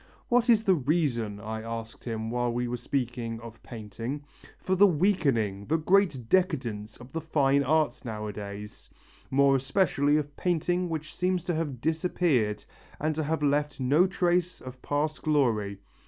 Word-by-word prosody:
'What 245 Hz, 0 st, +3 dB
is 225 Hz, -2 st, +5 dB
the 195 Hz, -, +4 dB
reason,' 130 Hz, -, 0 dB
I 110 Hz, +1 st, -5 dB
asked 115 Hz, 0 st, -7 dB
him 110 Hz, -1 st, -3 dB
while 120 Hz, 0 st, 0 dB
we 120 Hz, +1 st, -1 dB
were 120 Hz, -, -2 dB
speaking 120 Hz, -2 st, -3 dB
of 115 Hz, -1 st, -11 dB
painting, 115 Hz, +5 st, -6 dB, 0.3 s
'for 185 Hz, -, -2 dB
the 200 Hz, +2 st, +7 dB
weakening, 140 Hz, -, +1 dB
the 160 Hz, -, +2 dB
great 165 Hz, -, +2 dB
decadence 125 Hz, -, 0 dB
of 125 Hz, +1 st, -13 dB
the 165 Hz, -, -3 dB
fine 140 Hz, -3 st, +2 dB
arts 155 Hz, +2 st, +1 dB
nowadays; 105 Hz, -2 st, -7 dB, 0.4 s
more 140 Hz, 0 st, +4 dB
especially 145 Hz, 0 st, +2 dB
of 145 Hz, -1 st, -3 dB
painting 175 Hz, +1 st, 0 dB
which 155 Hz, -1 st, -5 dB
seems 180 Hz, -1 st, 0 dB
to 175 Hz, -, -1 dB
have 150 Hz, -7 st, -3 dB
disappeared 155 Hz, -, +1 dB, 0.3 s
and 155 Hz, +1 st, 0 dB
to 155 Hz, +1 st, -2 dB
have 155 Hz, +1 st, -1 dB
left 145 Hz, 0 st, +1 dB
no 145 Hz, +8 st, +4 dB
trace 180 Hz, -1 st, 0 dB
of 130 Hz, 0 st, -10 dB
past 150 Hz, +2 st, -1 dB
glory? 115 Hz, -10 st, +1 dB
140 Hz, 155 wpm, -28 LUFS, 115-165 Hz, 0.4 s, the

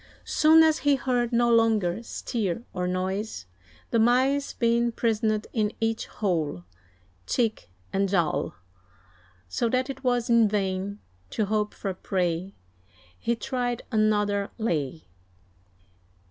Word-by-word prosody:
Soon 320 Hz, +1 st, +6 dB
as 315 Hz, -1 st, +3 dB
he 290 Hz, -1 st, +3 dB
heard 245 Hz, -2 st, 0 dB
no 240 Hz, 0 st, +3 dB
longer 220 Hz, -4 st, +2 dB
stir 225 Hz, -3 st, -3 dB
or 180 Hz, 0 st, -2 dB
noise, 185 Hz, -, -2 dB, 0.5 s
The 230 Hz, -, +3 dB
mice 260 Hz, +5 st, +3 dB
being 235 Hz, 0 st, +1 dB
prisoned 220 Hz, -2 st, 0 dB
in 215 Hz, -2 st, 0 dB
each 225 Hz, 0 st, -1 dB
hole, 160 Hz, -, -2 dB, 0.6 s
Cheek 225 Hz, -, -1 dB, 0.2 s
and 195 Hz, 0 st, +1 dB
jowl; 175 Hz, -5 st, 0 dB, 0.9 s
So 230 Hz, -, -1 dB
that 255 Hz, +3 st, 0 dB
it 270 Hz, 0 st, -11 dB
was 245 Hz, -2 st, +1 dB
in 235 Hz, -2 st, +5 dB
vain 200 Hz, 0 st, -2 dB, 0.3 s
to 215 Hz, -, -1 dB
hope 210 Hz, 0 st, -1 dB
for 195 Hz, -2 st, -3 dB
prey, 180 Hz, 0 st, -2 dB, 0.6 s
He 235 Hz, -, 0 dB
tried 245 Hz, 0 st, -2 dB
another 210 Hz, -2 st, +1 dB
"lay." 160 Hz, -, -2 dB
220 Hz, 120 wpm, -26 LUFS, 195-240 Hz, 0.9 s, Soon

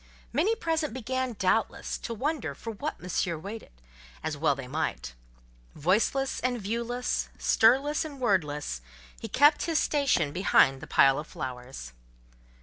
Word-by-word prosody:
Many 360 Hz, -, +2 dB
present 320 Hz, -, -1 dB
began, 260 Hz, 0 st, -2 dB
doubtless, 210 Hz, +2 st, 0 dB
to 230 Hz, -, -5 dB
wonder 295 Hz, +6 st, -2 dB
for 230 Hz, -, -6 dB
what 285 Hz, +8 st, -5 dB
Monsieur 175 Hz, -1 st, -1 dB
waited; 200 Hz, +8 st, -8 dB, 0.5 s
as 155 Hz, -1 st, -2 dB
well 145 Hz, -1 st, +2 dB
they 135 Hz, -2 st, -7 dB
might. 135 Hz, -, -3 dB, 0.6 s
Voiceless 215 Hz, -, +1 dB
and 250 Hz, -1 st, -1 dB
viewless, 235 Hz, +4 st, -2 dB
stirless 270 Hz, +7 st, +3 dB
and 295 Hz, -3 st, -8 dB
wordless, 150 Hz, -, 0 dB, 0.4 s
he -, -, -5 dB
kept 295 Hz, +2 st, +4 dB
his 330 Hz, -2 st, +1 dB
station 275 Hz, -, +2 dB
behind 135 Hz, -7 st, +4 dB
the -, -, -8 dB
pile 135 Hz, 0 st, +5 dB
of 150 Hz, -, -7 dB
flowers. 125 Hz, -, -7 dB
225 Hz, 140 wpm, -28 LUFS, -, 0.6 s, pile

